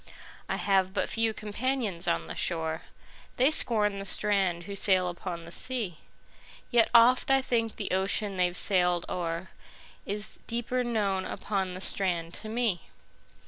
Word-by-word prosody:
I - - 0
have 190 -1 +1
but - - 0
few 225 -1 +1
companions 215 -3 -2
on 85 -1 0
the 80 - -6
shore:They 165 - -2
scorn 210 -8 +2
the 195 - -5
strand 195 -4 +1
who 200 +2 -6
sail 185 -2 +4
upon 175 -1 -6
the 170 - -10
sea; 215 -5 -3 0.7
Yet 235 -2 +4
oft 240 +3 +5
I 270 0 +5
think 230 -4 -1
the 205 - -4
ocean 195 +2 +1
they've 180 -1 +1
sailed 180 -3 +2
o'erIs 180 +4 -6
deeper 240 +2 -1
known 205 -5 0
upon 190 -2 -3
the 185 - -7
strand 175 -4 -1
to 215 - -7
me. 220 -6 -1
195 Hz, 145 wpm, -28 LUFS, 180-225 Hz, 0.7 s, oft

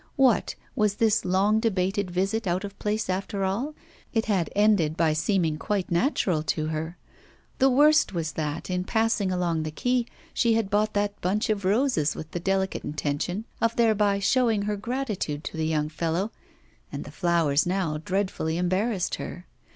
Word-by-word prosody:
What! 265 -6 +3 0.2
was 210 -1 +2
this 220 0 +2
long 200 +4 +3
debated 200 -2 0
visit 195 +4 -1
out 180 +2 0
of 200 0 -8
place 215 +1 -1
after 195 +2 -2
all? 235 +11 -1 0.4
It 225 - +2
had 190 -7 +1
ended 200 -7 +3
by 160 -2 +3
seeming 160 -1 0
quite 200 -3 -2
natural 175 - +1
to 155 0 -1
her. 160 +2 -4 0.6
The 270 - +5
worst 300 +4 +5
was 165 -4 -2
that, 150 0 -3
in 180 0 0
passing 220 -2 +1
along 175 -3 0
the 155 - -3
quay, 245 +9 0 0.3
she 230 -1 +3
had 220 -3 0
bought 210 +1 +1
that 205 0 -1
bunch 210 +6 0
of 200 -3 -2
roses 200 - +2
with 155 - -8
the 175 - -3
delicate 190 +1 -1
intention 155 +7 -2 0.2
of 230 0 +2
thereby 210 -3 +3
showing 225 0 +2
her 210 0 -1
gratitude 210 - -3
to - - -6
the 160 0 -1
young 155 -1 0
fellow, 165 +6 -2 0.6
and - - -5
the - - -10
flowers 170 -4 +2
now 180 -5 -1
dreadfully 185 -2 -1
embarrassed 185 +3 0
her. 180 - -7
195 Hz, 170 wpm, -26 LUFS, 170-215 Hz, 0.6 s, The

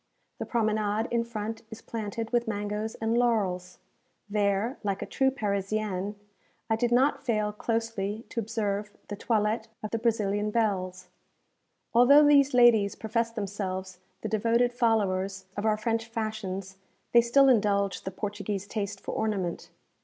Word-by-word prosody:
The - - -4
promenade 215 -1 0
in 235 -1 +2
front 225 -1 -5
is 220 - -10
planted 225 0 -4
with 240 -1 +1
mangoes 210 +1 -3
and 225 +1 -1
laurels. 205 -7 0 0.5
There, 205 +3 0
like 200 -2 -1
a - - -4
true 265 0 +1
Parisienne, 205 -3 -2 0.6
I - - +5
did 240 +2 0
not 270 +3 +3
fail 215 -5 0
closely 225 -1 -2
to 235 - -3
observe 210 -2 -2 0.2
the 205 - -3
toilettes 215 +1 0 0.2
of 215 - -4
the 230 - -1
Brazilian 210 -2 0
belles. 185 -5 -1 0.8
Although 275 +5 +7
these 280 -2 +5
ladies 230 -5 +5
profess 230 +1 -1
themselves 190 -4 -4 0.2
the - - -3
devoted 230 +3 +2
followers 195 -5 0
of 205 +2 -1
our 215 -1 +2
French 225 +1 -1
fashions, 210 -4 -4 0.3
they 235 - +7
still 270 +4 +4
indulge 200 -6 +2
the - - -4
Portuguese 205 0 -4
taste 200 -1 -4
for - - -6
ornament. 200 -6 -2
215 Hz, 145 wpm, -28 LUFS, 200-230 Hz, 0.8 s, Although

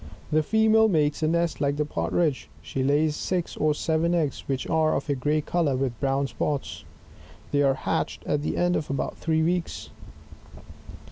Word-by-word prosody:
The 155 +1 +4
female 220 +5 +4
makea 150 -5 +1
a 155 - +2
nest 170 +1 0
like 140 0 +1
the 150 - 0
partridge; 150 - -1
she 130 +10 -3
lays 150 +3 +2
six 180 +1 -2
or 150 0 +1
seven 165 +3 +1
eggs 150 -6 -1
which 135 -2 -2
are 160 -1 +2
of - - -3
a - - +3
gray 150 +3 0
colour 155 -3 0
with 130 -3 -2
brown 135 0 +1
spots. 140 +1 -3 0.7
They 145 - +2
are 135 -1 +3
hatched - - -2
at 150 - 0
the - - -2
end 175 0 +2
of 150 - -2
about 140 - -3
three 160 -1 +1
weeks. 175 +1 -2
150 Hz, 180 wpm, -26 LUFS, 140-165 Hz, 0.7 s, The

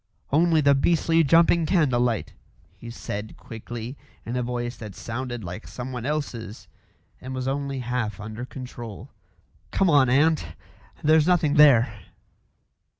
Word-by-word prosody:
"Only 160 +2 +4
the 140 -1 +5
beastly 165 +3 +3
jumping 165 +2 +4
candle 150 -10 +2
light," 120 -4 -1 0.4
he 120 - -10
said 110 -2 -6
quickly, 115 +3 -8 0.3
in 120 - -4
a 125 - 0
voice 120 0 -3
that 105 -4 -9
sounded 120 0 -5
like 85 -2 -7
someone 125 +4 -6
else's 120 -9 -4 0.5
and 130 +1 -6
was 130 0 -3
only 140 -1 -2
half 120 -4 -3
under 110 +2 -7
control. 125 -4 -9 0.6
"Come 190 -3 +2
on, 140 -4 +5
aunt. 155 +5 +2 0.5
There's 155 +1 +4
nothing 170 -5 +3
there." 125 -8 +5
125 Hz, 135 wpm, -25 LUFS, 115-150 Hz, 0.6 s, the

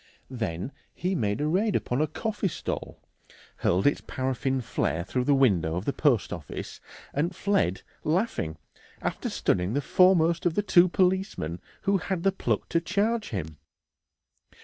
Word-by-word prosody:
Then 110 -3 -3 0.2
he 180 +2 -1
made 105 - 0
a 150 - +1
raid 200 +6 +1
upon 125 +4 0
a 155 - +2
coffee 210 +5 -2
stall, 170 - -5 0.6
hurled 90 +2 +1
its 145 - +3
paraffin 130 0 -1
flare 85 -6 -1
through 125 +7 -1
the 145 - +4
window 95 -12 +3
of 90 +4 -3
the 140 - 0
post 135 -9 +2
office, 80 -5 -7 0.3
and 170 +6 0
fled 190 - +1 0.2
laughing, 155 - 0 0.5
after - - -2
stunning 90 +4 0
the - - +3
foremost 170 +2 +4
of 165 - -1
the 205 - +1
two 185 -2 +6
policemen 185 - 0 0.2
who 200 0 +3
had 180 0 -3
the 195 - +4
pluck 195 - -1
to 165 - +2
charge 215 +5 0
him. 80 -7 -5
150 Hz, 155 wpm, -27 LUFS, -, 0.6 s, two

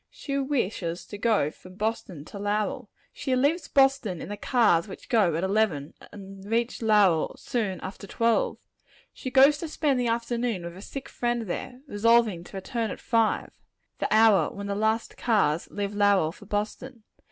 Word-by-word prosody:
She 275 - -5
wishes 210 - -2
to 205 - -8
go 210 -10 +2
from 185 +3 -15
Boston 200 -7 -3
to 200 - -9
Lowell. 205 +1 -2 0.2
She 260 -2 -1
leaves 290 +7 +1
Boston 270 - +2
in - - -7
the 205 - -4
cars 210 -7 +2
which 195 - -11
go 200 -9 +3
at 165 - -1
eleven, 190 -8 0 0.2
and 195 -1 -11
reach 230 +4 -1
Lowell 205 -7 +3
soon 210 -6 -2
after 195 +1 -8
twelve. 230 +3 +1 0.6
She 260 - -6
goes 275 +3 +6
to 330 - -4
spend 295 -4 0
the 245 - 0
afternoon 235 -3 -1
with 170 0 -7
a 190 - -10
sick 275 +5 -7
friend 240 -1 -2
there, 250 +6 -5
resolving 225 - +2
to 195 - -9
return 225 +3 -3
at - - -6
five 225 -2 0 0.5
the - - -2
hour 215 -2 +5
when 200 0 -7
the 200 - -2
last 220 +2 -1
cars 195 -9 +1
leave 205 0 -3
Lowell 200 -6 +3
for 205 +4 -15
Boston. 215 +4 -4
215 Hz, 175 wpm, -26 LUFS, 195-240 Hz, 0.6 s, goes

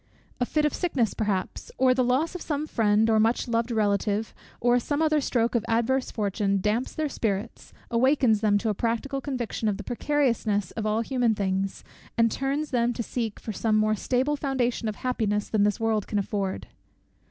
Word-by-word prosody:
A 245 - 0
fit 305 -1 +1
of 300 - +1
sickness, 265 - 0
perhaps, 200 -4 -2
or 260 -1 +4
the 255 0 +2
loss 260 +7 +1
of 360 - -6
some 295 -1 -2
friend 220 -5 +2
or 220 -1 +3
much 225 +3 +2
loved 230 0 0
relative, 210 -1 0 0.3
or 245 +1 +3
some 290 +4 -2
other 310 -1 +3
stroke 235 -3 0
of 235 -3 +1
adverse 235 +3 +1
fortune, 200 -2 0
damps 215 +6 -1
their 310 -1 0
spirits, 220 -4 -3 0.2
awakens 235 -2 +3
them 210 -2 +3
to 220 +2 -1
a - - +1
practical 235 +6 -2
conviction 245 -5 -3
of 205 -2 0
the 210 - -7
precariousness 230 - 0
of 220 -2 -3
all 215 +1 +1
human 240 -2 +1
things, 195 -1 -2 0.3
and 230 -1 +4
turns 280 +3 -2
them 240 -1 +1
to 235 - -3
seek 225 -2 -3
for 220 - -6
some 215 +2 0
more 215 0 +3
stable 255 +7 0
foundation 255 -5 -1
of 215 - -2
happiness 210 -5 -1
than 210 -2 +2
this 210 - 0
world 220 -2 0
can 210 - -2
afford. 195 -1 -2
230 Hz, 190 wpm, -26 LUFS, 210-260 Hz, 0.3 s, or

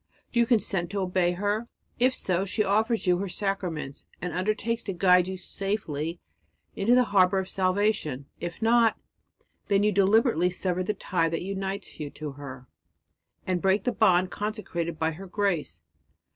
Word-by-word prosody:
Do 240 - +1
you 235 - +4
consent 195 -7 +1
to 200 - -3
obey 180 -1 +1
her? 205 +5 -1 0.3
If 255 +1 +3
so, 185 0 0
she 205 +2 0
offers 220 +3 +1
you 180 -1 +3
her 200 0 -3
sacraments 180 -8 -3
and 180 -2 -4
undertakes 215 +5 -1
to 195 - -2
guide 180 0 +4
you 190 0 -4
safely 175 -5 -3 0.6
into 230 +5 +3
the 250 - +6
harbour 195 -4 +3
of 190 -1 -1
salvation. 185 -8 0
If 175 +5 -5
not, 230 -1 +4 0.7
then 200 0 +3
you 210 - +3
deliberately 200 - +3
sever 180 0 -2
the 210 +3 -1
tie 170 -4 0
that 165 +1 -3
unites 195 +1 -4
you 150 -2 -4
to 150 -1 -5
her, 135 -2 -9 0.8
and 180 -2 0
break 195 +1 +2
the 245 - +1
bond 185 -5 +3
consecrated 190 -6 -3
by 160 0 0
her 190 +5 -9
grace. 180 - -1
190 Hz, 165 wpm, -27 LUFS, 175-210 Hz, 0.8 s, the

